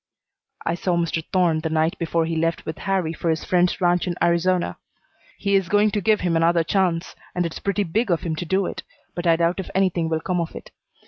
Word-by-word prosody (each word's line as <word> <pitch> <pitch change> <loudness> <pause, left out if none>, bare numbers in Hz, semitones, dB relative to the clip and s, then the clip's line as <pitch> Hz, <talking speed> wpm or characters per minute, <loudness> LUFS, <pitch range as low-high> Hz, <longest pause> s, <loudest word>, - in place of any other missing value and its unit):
"I 170 - +1
saw 175 0 0
Mr. 165 -1 -1
Thorne 175 -4 +2
the 160 - -2
night 160 +1 +1
before 165 0 0
he 165 0 -2
left 165 +1 -1
with 160 - -5
Harrie 190 -5 -1
for 170 - -2
his 160 -1 0
friend's 180 -1 +2
ranch 175 0 +2
in 175 - -1
Arizona. 175 +1 +1 0.6
He 200 -1 -1
is 195 -3 +2
going 205 +1 +3
to 205 - -1
give 215 +2 +2
him 175 -2 +1
another 165 +1 +3
chance, 180 -1 0 0.2
and 180 -1 +1
it's 165 - -5
pretty 200 +1 0
big 205 +6 -1
of 170 -3 +1
him 160 -2 -2
to 175 - -3
do 190 +3 +1
it, - - -5 0.3
but 175 0 -3
I 165 - +6
doubt 170 +2 +1
if 190 - -5
anything 180 -4 +1
will 160 -1 0
come 180 +1 -1
of 165 - -5
it. - - -10
175 Hz, 235 wpm, -23 LUFS, 165-185 Hz, 0.6 s, I